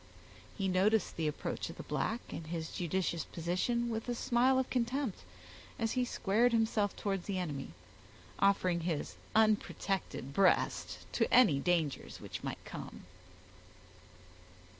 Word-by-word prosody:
He 195 -2 0
noticed 195 +3 +2
the 160 -2 0
approach 150 - -3
of - - -9
the - - -6
black, 230 +2 -1
and 160 - -6
his 165 -1 -4
judicious 175 -2 -1
position, 185 +8 -1
with 225 +1 -3
a 240 - 0
smile 250 +3 +3
of 260 0 0
contempt, 250 -2 -1 0.6
as 225 -1 0
he 255 - +1
squared 235 +1 +2
himself 220 -2 +2
towards 195 -3 -2
the 200 -2 -1
enemy, 145 - -4 0.6
offering 185 -3 +3
his 165 -3 -2 0.2
unprotected 200 -9 +1
breast 195 +2 +2
to - - +1
any 210 - +6
dangers 165 -3 0
which - - -7
might - - -5
come. - - -8
195 Hz, 135 wpm, -33 LUFS, 170-230 Hz, 0.6 s, any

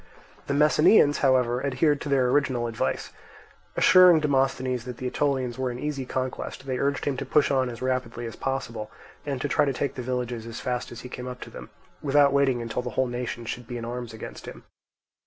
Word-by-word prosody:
The 140 - 0
Messenians, 150 +1 +5
however, 130 -2 +2
adhered 140 +2 +1
to 145 - -4
their 135 -2 +3
original 130 -3 +1
advice. 115 -1 -2 0.7
Assuring 180 -3 +7
Demosthenes 130 -4 0
that 125 -2 -7
the 130 - -6
Aetolians 130 -2 -1
were 130 -1 0
an 120 - -5
easy 140 -1 -4
conquest, 130 +1 -4
they 130 -2 -2
urged 140 0 0
him 140 -2 -1
to - - -3
push 150 -2 +2
on 130 -2 +2
as 120 +1 -7
rapidly 125 -2 -2
as 115 - -6
possible, 115 -5 -4 0.4
and 140 -3 -2
to - - 0
try 150 - +2
to 140 -2 0
take 135 +1 -2
the 125 - -5
villages 120 -2 -3
as 115 - -6
fast 125 -1 -3
as 120 - -8
he - - -8
came 125 0 -7
up 125 0 -6
to - - -8
them, - - -10 0.3
without 140 -1 +4
waiting 135 -4 +2
until 115 +1 -3
the 125 - -5
whole 130 - +3
nation 120 -1 -4
should 120 +1 -5
be 120 -1 -5
in 115 - -5
arms 120 0 -5
against 110 - -9
him. - - -9
130 Hz, 210 wpm, -26 LUFS, 120-140 Hz, 0.7 s, Assuring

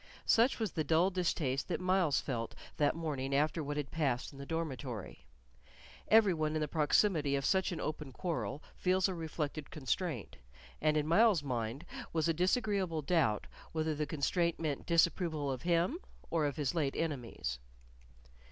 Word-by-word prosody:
Such 235 +4 +4
was 220 -5 -1
the 155 - -1
dull 165 +5 +3
distaste 160 -7 0
that 175 - -1
Myles 185 -5 +2
felt 115 -4 -3 0.2
that 145 0 +2
morning 140 -5 -2
after 155 +2 +1
what 145 +1 -3
had 145 -2 -3
passed 140 -5 -1
in 135 - -12
the 140 - -7
dormitory. 130 - -4 0.8
Every 215 -3 +6
one 155 -1 -1
in - - +1
the 150 - 0
proximity 150 0 +2
of 140 -1 -1
such 190 -1 +2
an 170 - -4
open 150 -3 -4
quarrel 155 -2 -3
feels 185 +1 +2
a 190 - -2
reflected 155 -3 -4
constraint, 140 - -3 0.4
and 155 0 +3
in 150 - +1
Myles's 190 0 +4
mind 125 +2 -3 0.3
was 160 0 +1
a 165 - +3
disagreeable 185 -2 +1
doubt 140 - +2 0.3
whether 160 -1 0
that 150 0 -3
constraint 170 +3 0
meant 155 -4 -3
disapproval 165 -3 +2
of 130 - -4
him 175 - +1 0.3
or 160 -3 +2
of 145 - -3
his 150 -2 -1
late 150 -5 0
enemies. 120 - -3
155 Hz, 165 wpm, -33 LUFS, 140-175 Hz, 0.8 s, Every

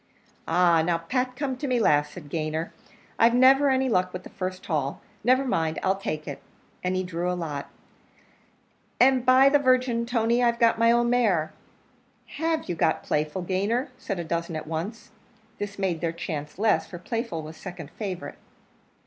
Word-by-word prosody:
"Ah! 170 -1 +4
now, 170 +1 +1
Pat, 250 +9 -2
come 270 -1 -2
to 285 - -4
me 250 -2 +1
last," 150 -8 +3
said 170 -5 -10
Gayner; 155 0 -2 0.5
"I've 230 +1 +5
never 270 +3 +6
any 265 0 +2
luck 185 -6 +1
with 185 0 -6
the - - -12
first 185 0 -5
haul; 145 -4 -2 0.2
never 255 +4 +3
mind, 160 -10 0
I'll 190 0 +2
take 155 -6 -5
it," 145 - -6 0.4
and 180 0 0
he 185 - 0
drew 180 0 -2
a 180 - -2
lot, 150 -5 -5 1.3
"and, 255 0 +5
by 255 +2 +6
the 290 +1 +5
Virgin, 255 -3 +2
Tony, 235 0 +2
I've 235 -1 +2
got 230 -1 +3
my 230 0 +5
own 240 0 +2
mare!" 200 -11 +2 0.9
"Have 325 0 0
you - - -1
got 160 -1 +1
Playful, 150 +5 -1
Gayner?" 200 +8 -1
said 195 - -4
a 175 - -3
dozen 170 0 -3
at 155 - -4
once. 165 +7 -5 0.5
This 205 0 -5
made 185 -5 -1
their 165 -1 0
chance 150 -3 -6
less, 215 +1 +2
for 175 - -8
Playful 205 -3 -4
was 155 +1 -9
second 175 -4 -9
favourite. 190 -4 -6
190 Hz, 180 wpm, -26 LUFS, 165-245 Hz, 1.3 s, never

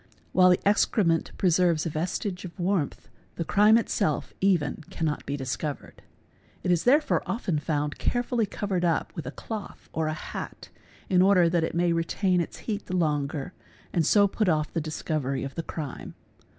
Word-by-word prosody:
While 185 0 +6
the 180 +2 +2
excrement 195 -5 +2
preserves 175 -3 +3
a 165 - -2
vestige 180 +4 -3
of 180 +1 -9
warmth 175 -4 -1 0.3
the 170 - -2
crime 210 +5 +5
itself 155 -9 -1
even 180 -5 +1
cannot 155 -3 -2
be 140 - -2
discovered. 140 +2 -5 0.6
It 180 - +1
is 170 -2 +1
therefore 295 +5 +4
often 185 -9 -1
found 150 -1 -2
carefully 245 -2 0
covered 190 -3 -2
up 170 -2 0
with 155 -6 -5
a - - -3
cloth 215 +5 -7
or 160 -1 0
a 155 - -1
hat - - -7 0.4
in 180 -1 +4
order 185 -3 +5
that 170 -1 +1
it 160 - -2
may 170 0 +2
retain 180 +2 +1
its 170 - -5
heat 210 -2 -3
the 185 - -2
longer 150 0 -1 0.4
and 170 - +2
so 200 +5 +5
put 205 0 0
off 155 -2 0
the 165 - 0
discovery 150 -3 -2
of 135 -1 -5
the 165 - -3
crime. 155 -4 -6
170 Hz, 175 wpm, -27 LUFS, 155-195 Hz, 0.6 s, While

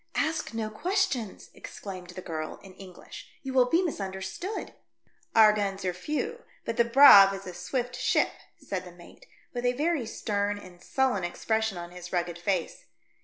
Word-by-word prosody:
"Ask 315 -7 -1
no 220 -1 -2
questions," 340 - -1
exclaimed 185 -3 -9
the 180 +1 -8
girl 155 -2 -5
in 190 -1 -13
English. 185 -2 -12
"You 265 -1 -4
will 255 -1 +5
be 340 +6 +3
misunderstood." 205 - -4 0.6
"Our 215 -1 +8
guns 195 -2 -2
are 180 - 0
few, 305 - -3 0.2
but 230 - -3
the 235 - +6
Braave 230 -6 +9
is 195 - -9
a 180 - -7
swift 245 +8 -3
ship," - - +2 0.3
said 200 - -5
the 180 - -11
mate, 175 0 -16 0.3
with 245 -1 -3
a 245 0 +2
very 295 -2 0
stern 205 -2 -1
and 180 -3 -13
sullen 255 -6 0
expression 220 +3 -1
on 175 0 -7
his 180 0 -9
rugged 175 -1 -2
face. 175 -1 -2
205 Hz, 170 wpm, -28 LUFS, 185-255 Hz, 0.6 s, Braave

